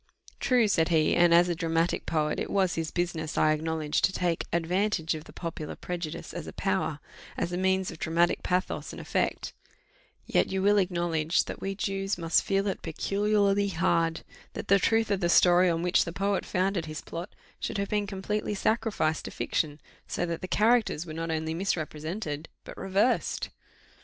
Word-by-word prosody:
"True," 245 -4 +3
said 165 -5 +2
he; 160 -2 +3
"and 175 0 +5
as 170 +1 +6
a 175 - +1
dramatic 165 0 0
poet, 150 -1 0
it - - -3
was 190 -3 +2
his 165 -1 -2
business, 170 -3 -2
I 155 - +4
acknowledge, 155 -1 -1
to - - +3
take 175 -3 -1
advantage 170 0 0
of 155 0 -7
the - - -13
popular 165 -3 -6
prejudice 175 -3 -5
as - - -6
a - - -7
power - - -1 0.4
as 175 - -1
a - - -2
means 190 0 +1
of 165 - -11
dramatic 170 +2 +1
pathos 180 +1 -1
and - - -8
effect; - - -1 0.7
yet - - +2
you 190 0 -1
will 205 +1 +5
acknowledge 170 -3 +1
that - - -7
we 195 0 -3
Jews 195 -1 -2
must 165 -1 +2
feel 195 0 0
it 195 - -2
peculiarly 200 +4 +1
hard, 165 -2 +1 0.3
that - - -6
the 200 +1 +6
truth 225 +2 +2
of 200 - +1
the 175 -2 +1
story 180 +1 +6
on 165 0 0
which 180 0 +3
the 170 - -5
poet 195 +3 -1
founded 185 -2 0
his 155 0 -5
plot 170 +4 -7 0.2
should - - -3
have 200 0 -2
been 210 -1 0
completely 205 +2 -2
sacrificed 210 -7 0
to - - -4
fiction, 150 -1 -2 0.3
so 175 - -1
that 170 -1 -4
the 185 - -4
characters 220 -6 +2
were 160 - -7
not 165 +1 -4
only 160 0 -1
misrepresented, 160 -2 -3
but - - -10
reversed." 195 +6 0
175 Hz, 185 wpm, -28 LUFS, 165-195 Hz, 0.7 s, as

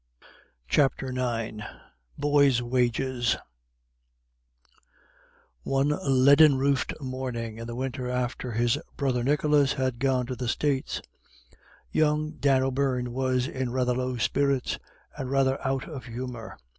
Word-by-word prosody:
CHAPTER 135 - +1
IX 115 -4 -2 0.6
BOYS' 140 -4 +3
WAGES 125 0 +1 2.2
One 135 - +1
leaden 140 +2 +6
roofed 140 +2 0
morning 125 -4 -4
in 115 - -6
the 120 - -5
winter 130 0 -3
after 125 -1 -2
his 120 +4 +1 0.2
brother 130 -4 0
Nicholas 145 +1 +3
had 130 -3 -2
gone 130 -1 +1
to 130 +1 -4
the 125 -1 -4
States, 135 +2 -1 0.9
young 155 0 +1
Dan 135 -2 +3
O'Beirne 130 -2 0
was 130 0 0
in 130 -2 -3
rather 125 0 +1
low 125 0 -2
spirits, 140 +2 0 0.4
and 130 - -5
rather 135 0 +2
out 135 0 -1
of 135 -8 -7
humour. 120 -1 -7
130 Hz, 120 wpm, -27 LUFS, 125-135 Hz, 2.2 s, leaden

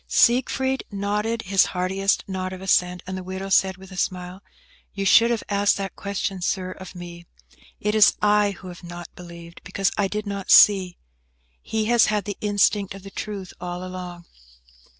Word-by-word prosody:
Siegfried 260 +2 +2
nodded 210 +3 -2
his 195 0 +3
heartiest 190 +2 +1
nod 185 -1 -4
of 185 - -8
assent, 180 -1 +1
and 185 0 -5
the 185 - -6
widow 190 +1 -6
said, 190 0 +3
with 190 0 -14
a - - -9
smile, 180 0 -3 0.5
"You 195 -1 -2
should 230 +4 +6
have 235 -2 -1
asked 205 0 +2
that 195 -1 -5
question, 200 -1 -3
Sir, 185 +1 -1
of 190 0 -10
me. 175 -1 -10 0.5
It 210 +1 -1
is 215 -1 +6
I 210 0 +3
who 185 - -10
have 175 0 -11
not 175 0 -9
believed, 170 -1 -12
because 195 -1 -1
I 200 - +2
did 210 +2 -4
not 200 -1 -5
see. 190 -4 +6 0.6
He 220 -1 -2
has 235 0 +4
had 210 -1 0
the 205 - -4
instinct 205 -1 +1
of 195 - -11
the 195 - -10
truth 195 -2 -6
all 180 0 -5
along." 180 -2 -8
195 Hz, 180 wpm, -23 LUFS, 185-205 Hz, 0.6 s, should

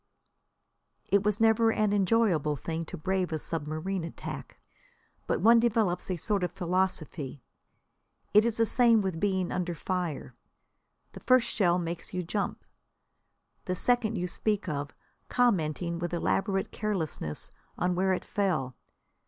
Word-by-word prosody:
It 200 - +4
was 210 0 0
never 225 0 +4
an 215 -2 +1
enjoyable 195 -7 +2
thing 165 +3 -4
to - - -7
brave 180 -1 -1
submarine 160 +4 -3
attack, 165 - -7 0.7
but - - 0
one 230 +2 +7
develops 220 -7 +1
a 185 - 0
sort 200 +2 -1
of 180 - -1
philosophy. 175 - -2 0.9
It 210 +1 +7
is 230 -1 0
the 230 - +4
same 230 0 +4
with 185 -4 -2
being 190 -2 0
under 175 -1 -2
fire. 175 -3 -3 0.8
The - - -10
first 255 -2 +4
shell 180 -4 +2
makes 170 0 -4
you 180 - -1
jump. 200 +4 -3 1.0
The 180 - -1
second 235 +2 +1
you 180 - -1
speak 210 +3 -1
of, 145 -3 -3 0.4
commenting 170 -8 +1
with 175 0 -2
elaborate 195 +3 0
carelessness 165 - -3 0.3
on 180 0 +1
where 190 +2 +1
it 185 - -1
fell. 155 - -1
185 Hz, 135 wpm, -29 LUFS, 170-210 Hz, 1.0 s, one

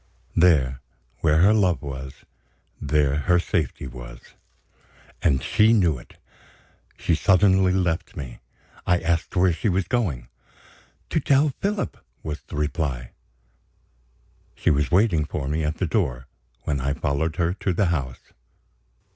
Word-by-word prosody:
There, 70 -7 +3 0.4
where 80 +1 +3
her 105 +3 +6
love 95 -7 +2
was 65 -1 -8 0.6
there 75 -1 +1
her 85 +4 +2
safety 80 -7 -1
was. - - -9 1.0
And 70 -6 +2
she 110 +1 +4
knew 85 - +2
it! - - -17 0.8
She - - 0
suddenly 95 +2 +4
left 90 -3 -1
me. 65 -4 -7 0.5
I 90 -1 +3
asked 85 +2 -1
where 90 -1 +4
she 80 +6 -1
was 95 0 0
going. 85 - -1 0.8
"To - - +2
tell 140 +1 +3
Philip," 200 0 -2 0.2
was 75 0 -5
the - - -10
reply. 75 -5 -2 1.4
She - - +1
was 75 0 +1
waiting 90 -4 +3
for 75 -2 -4
me 75 +3 -1
at 75 +1 -2
the 95 - 0
door, 65 - -1 0.4
when 70 -3 -1
I 70 +1 0
followed 75 +3 -1
her 85 +1 0
to 95 0 -2
the 95 +3 +1
house. 65 -6 -5
80 Hz, 140 wpm, -24 LUFS, 70-95 Hz, 1.4 s, her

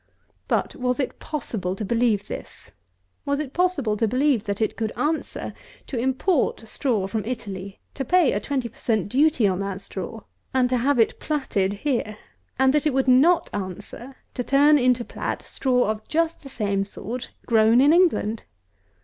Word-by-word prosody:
But, - - 0
was 250 +1 -1
it 265 - -2
possible 215 -11 -3
to 210 - -4
believe 230 -2 +1
this? - - -8 0.5
Was 280 0 -1
it 285 -3 -4
possible 330 -12 +1
to 225 - +2
believe 255 -1 +2
that 200 -1 -2
it 220 - 0
could 220 -1 -2
answer 310 +2 -2 0.3
to - - -6
import 260 - 0
straw 220 -4 0
from 215 +2 -2
Italy, 200 -4 -6
to 270 - -3
pay 345 +1 +4
a 205 - 0
twenty 260 +2 -2
per - - -18
cent. 215 -5 0
duty 280 -1 +3
on 185 -1 0
that 195 -1 -3
straw, 195 +3 -7 0.3
and 250 -1 +3
to 255 - +2
have 270 +3 +2
it 225 - +2
platted 210 -10 -1
here; 230 -7 -1 0.4
and 265 +1 +4
that 300 +1 +2
it 280 - 0
would 270 0 +1
not 285 +8 +4
answer 205 +7 -6 0.2
to 250 - -3
turn 290 +3 +5
into 250 -1 +2
plat - - -4
straw 250 -2 +1
of 215 0 -7
just 330 +1 0
the 275 - -10
same 200 -5 -1
sort 235 +5 -6 0.2
grown 225 0 +5
in 285 +4 +6
England? 330 - +2
245 Hz, 175 wpm, -24 LUFS, 210-280 Hz, 0.5 s, in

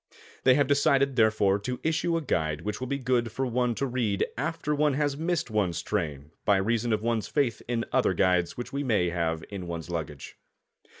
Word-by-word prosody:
They 130 -1 +7
have 145 0 +3
decided, 140 -1 +3
therefore, 110 -4 +3
to 125 +4 -4
issue 165 +1 +1
a 165 - -3
guide 80 - -1
which 105 +4 -4
will 130 - -4
be 140 - -1
good 125 -3 0
for 130 +4 -2
one 125 -1 0
to 140 - -1
read 120 -6 0
after 150 +2 -2
one 150 -1 +2
has 145 -1 0
missed 160 -4 -1
one's 100 -5 0
train 75 -8 -3
by 100 - +4
reason 115 +4 0
of 110 0 0
one's 115 -2 0
faith 135 -7 0
in 120 -1 -1
other - - +2
guides 90 -2 +2
which 120 - -6
we 140 +1 -1
may 105 -9 +2
have 80 -2 -1
in 95 -3 -5
one's 85 0 -5
luggage. 75 -4 -5
115 Hz, 200 wpm, -27 LUFS, 95-140 Hz, -, They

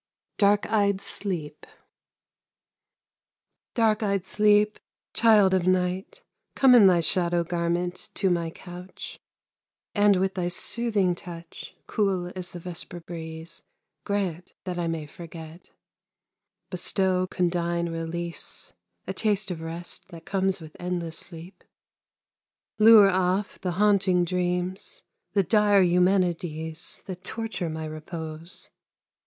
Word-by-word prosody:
DARK 205 0 +4
EYED 200 -2 +2
SLEEP 180 -6 -5 2.1
Dark 220 -2 +3
eyed 200 -3 0
Sleep, 210 +1 +3 0.3
child 215 -4 +5
of 185 -1 +2
Night, 185 - 0 0.3
Come 265 -2 +6
in 225 -5 +8
thy 175 -2 +5
shadow 175 0 +1
garment 175 +1 -2
to 190 -2 +2
my 170 -1 0
couch, 180 +2 -9 0.7
And 205 -1 +5
with 190 +1 +1
thy 180 -2 -1
soothing 200 0 +1
touch, 170 -2 -9
Cool 190 -4 0
as 180 -1 -5
the 175 - -7
vesper 175 0 -4
breeze, 165 0 -8 0.4
Grant 185 -4 -2
that 180 -1 -4
I 170 - -1
may 165 -2 -3
forget; 165 +1 -11 1.0
Bestow 185 0 +1
condign 170 -1 0
release, 165 0 -5 0.3
A - - -3
taste 205 -1 0
of 165 -2 -5
rest 170 +3 -7
that 170 -3 -12
comes 190 -1 0
with 155 -2 -12
endless 175 -2 -3
sleep; 170 +2 -12 1.2
Lure 215 -2 +8
off 185 +2 0
the 180 -2 -1
haunting 190 -2 +3
dreams, 180 +1 -2 0.3
The 200 -1 +3
dire 205 0 +4
Eumenides 175 -3 0
That 185 -1 -7
torture 220 -7 -3
my 160 0 -4
repose. 155 +2 -6
180 Hz, 115 wpm, -26 LUFS, 170-195 Hz, 2.1 s, in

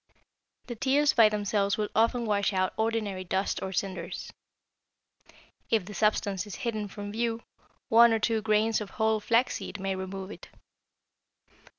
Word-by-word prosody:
The 240 - -5
tears 275 +5 +2
by 225 -3 +6
themselves 205 -1 0
will 210 -1 -1
often 230 +2 +2
wash 205 -1 +1
out 185 0 0
ordinary 220 -4 -1
dust 190 +2 -1
or 190 - -4
cinders. 185 -2 -4 1.4
If 220 -5 +2
the 205 - -9
substance 205 -1 0
is 205 - -7
hidden 215 -3 -2
from 205 0 -7
view, 230 +1 -2 0.4
one 235 +1 +7
or 225 - +3
two 220 0 0
grains 215 +1 +2
of 205 - -6
whole 220 0 +2
flaxseed 230 -1 0
may 195 0 -2
remove 190 +1 -6
it. - - -11
210 Hz, 150 wpm, -28 LUFS, 195-225 Hz, 1.4 s, one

